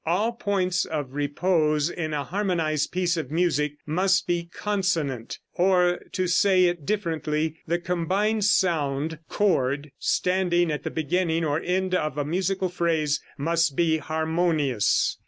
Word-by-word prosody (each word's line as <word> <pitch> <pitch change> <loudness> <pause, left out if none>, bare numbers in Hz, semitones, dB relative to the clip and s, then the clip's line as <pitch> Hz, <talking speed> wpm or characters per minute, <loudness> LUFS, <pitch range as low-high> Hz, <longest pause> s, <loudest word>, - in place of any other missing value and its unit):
All 190 +8 +1
points 190 -5 0
of 145 -5 -4
repose 150 +1 +1
in 160 -3 -4
a 145 -2 -1
harmonized 165 -4 -1
piece 180 -1 0
of 155 -6 -3
music 150 -3 +1
must 185 +5 +2
be 170 -1 -2
consonant; 170 - -2 0.2
or, 180 -1 +3
to 185 - 0
say 185 +1 +4
it 175 -5 -1
differently, 160 -5 -1
the 170 +2 +1
combined 185 +5 0
sound 160 -6 +1
(chord) 145 -8 0
standing 180 -2 +1
at 150 - -3
the - - -2
beginning 165 +1 0
or 150 0 0
end 185 +1 -1
of 155 -5 0
a 145 - -1
musical 185 +4 0
phrase 160 -4 0 0.2
must 165 0 +1
be 160 -1 +2
harmonious. 160 -7 0
170 Hz, 140 wpm, -25 LUFS, 150-185 Hz, 0.2 s, say